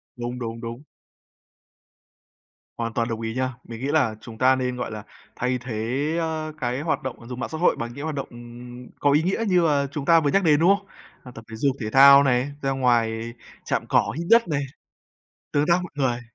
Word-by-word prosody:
Đúng, 120 +1 -5
đúng, 115 -1 -5
đúng. 120 +3 -7 1.9
Hoàn 115 -1 -3
toàn 115 0 0
đồng 115 -1 -4
ý 115 0 -3
nha. 130 0 -1
Mình 115 -1 -9
nghĩ 135 - -2
là 140 -8 +2
chúng 115 -2 -11
ta 130 +2 +4
nên, 125 -1 -2
gọi 125 - -4
là, 105 -1 -7 0.3
thay 125 +1 -1
thế, 125 +3 -3
a, 160 -1 -3
cái 125 +1 -2
hoạt 160 +1 -1
động 120 -3 -7
dùng 125 0 -7
mạng - - -3
xã 160 - -5
hội 175 - +3
bằng 120 0 -5
những 140 - -7
hoạt 155 -1 -3
động, 140 - -4
ừm, 120 +1 -11
có 145 - +3
ý 150 +3 +3
nghĩa 190 +6 0
như 180 -2 +3
là 140 -2 +1
chúng 145 -2 -5
ta 165 +1 +6
vừa 145 -3 0
nhắc 195 - +2
đến, 150 -3 +4
đúng 180 +5 +5
không? 200 0 -19 0.4
Hoặc 125 - -11
tập 115 - -11
thể 110 - -7
dục, 135 +3 0
thể 110 -4 -3
thao 140 +2 +8
này, 130 +1 +1
ra 135 - 0
ngoài 115 -3 0 0.3
chạm - - -1
cỏ, 100 - +2
hít 170 +1 -4
đất 230 -2 +5
này, 150 -4 -1 0.9
tương 145 0 +2
tác 170 - +5
mọi 180 - -8
người. 130 -4 0
130 Hz, 225 wpm, -24 LUFS, 120-150 Hz, 1.9 s, thao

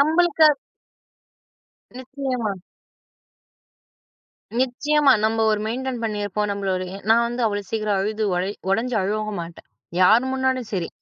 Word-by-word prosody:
நம்மளுக்கு 320 +2 +4 1.5
நிச்சயமா. 260 -4 -3 2.1
நிச்சயமா 275 +3 +3
நம்ம 225 +1 +1
ஒரு 210 -1 +1
மெயின்டெயின் 250 +2 -3
பண்ணியிருப்போம் 210 -1 -2
நம்மளோடய 190 -2 -3
நான் 230 +1 +5
வந்து 240 0 -2
அவ்வளோ 205 -1 -1
சீக்கிரம் 215 -3 0
அழுது 215 +2 -1
உடை 185 +2 -1 0.2
உடைஞ்சு 230 +4 0
அழகவும் 210 0 -2
மாட்டேன், 165 0 -11 0.3
யார் 220 +7 +6
முன்னாடியும் 260 -3 -1
சரி. 175 -3 -2
220 Hz, 110 wpm, -22 LUFS, 205-260 Hz, 2.1 s, யார்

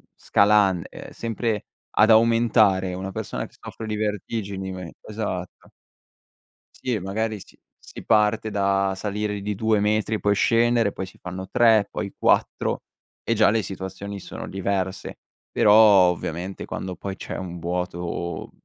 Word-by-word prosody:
scalan 100 -4 +3
ehm, - - -10
sempre 115 -2 -2 0.3
ad 110 +2 +4
aumentare 110 -4 +4
una 95 +1 -5
persona - - -4
che - - -17
soffre 110 - -8
di 110 - -2
vertigini 100 -4 -4
esatto. 100 -4 -5 1.1
Sì, 125 -4 -2
magari 110 +3 -2
si - - -16 0.2
si - - -11
parte 110 0 +2
da 100 -1 +1
salire 105 0 -3
di 105 0 -3
2 110 0 +2
metri, 110 +1 +1
poi 105 0 +2
scendere, 115 -1 +3
poi 95 - -5
si - - -16
fanno 95 +1 -7
3, 110 -4 +4
poi 100 -2 -5
4 - - +1 0.4
e 115 - +1
già 110 -2 +4
le 110 -1 +1
situazioni 100 +1 -6
sono - - -8
diverse. 95 0 -3 0.3
Però, 105 - +4
ovviamente 95 -4 +4
quando 95 -1 -5
poi 95 +2 -6
c'è - - -7
un 90 -2 -6
vuoto 85 0 -4
100 Hz, 140 wpm, -24 LUFS, 95-110 Hz, 1.1 s, ad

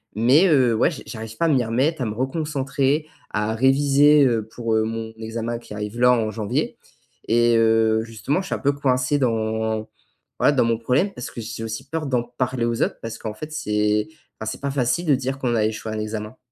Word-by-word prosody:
mais 130 - +5
heu, 130 -8 +4
ouais 115 - +3
j 155 - -8
j'arrive 110 -1 -7
pas 170 - +1
à - - +4
m'y 130 -5 +2
remettre 135 +7 0
à - - 0
me 105 - -2
reconcentrer, 140 +2 -1 0.2
à 105 +1 -1
réviser, 140 +3 +5
heu, 115 -4 +1
pour, 115 0 -2
heu, 110 - +3
mon 110 0 -4
examen 115 +1 -3
qui 115 - -11
arrive 105 +2 -5
là, 125 0 +6
en 110 -3 0
janvier 110 -1 -2 0.5
et 120 +1 +4
heu, 110 0 +3
justement 115 - -2
je - - -8
suis - - -1
un - - -6
peu 140 - +2
coincé 130 0 +1
dans 110 -2 -1 0.5
voilà, - - +4
dans 135 - +3
mon 115 -1 +1
problème, 130 - +1
parce 125 - -7
que 120 - -7
j'ai 115 0 -6
aussi 110 +3 -5
peur 160 0 -3
d'en 125 -3 +1
parler 120 0 -3
aux 115 -1 -1
autres - - -2
parce 115 -1 -6
qu'en 110 - -5
fait 155 +8 -8
c'est 105 -7 0 0.3
ben 110 - -5
c'est - - -5
pas 140 0 -2
facile 135 +5 0
de 150 - +4
dire 130 +1 -3
qu'on 125 -3 0
a 110 -2 +2
échoué 110 0 -3
à - - -3
un - - -3
examen. 105 +2 -5
120 Hz, 225 wpm, -22 LUFS, 110-135 Hz, 0.5 s, là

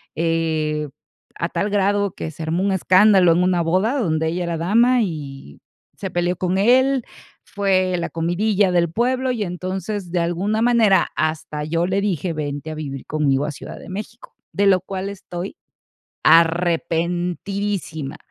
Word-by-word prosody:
eh, 155 -2 -1 0.5
a 170 - -2
tal 205 +4 -2
grado 200 0 +1
que 160 - -5
se 160 +1 -8
armó 165 +4 -1
un 195 -1 +1
escándalo 190 -1 +5
en 175 +2 +3
una 180 -1 +2
boda 185 - +1
donde 160 - 0
ella 175 +2 -2
era 170 -1 -2
dama 230 +9 +3
y 140 - -7 0.4
se 190 - -4
peleó 175 +1 0
con 185 +1 -1
él, 255 +4 +3 0.4
fue 185 -2 0
la 170 - -3
comidilla 185 +4 +1
del 170 -1 +2
pueblo 255 +4 0
y, 230 -4 -2
entonces, 185 +1 -4
de 175 - 0
alguna 185 +6 0
manera, 230 -5 +4
hasta 155 -1 -2
yo 165 +3 0
le 190 +2 0
dije, 185 -4 -1
vente 145 0 -4
a 155 - -6
vivir 140 -3 -6
conmigo 145 -3 +1
a 150 - -3
Ciudad 140 - -9
de - - -12
México, 210 +5 -8 0.2
de 200 0 +2
lo 185 -1 +5
cual 190 +1 -5
estoy 190 - -7 0.7
arrepentidísima, 170 0 +1
180 Hz, 155 wpm, -21 LUFS, 165-200 Hz, 0.7 s, escándalo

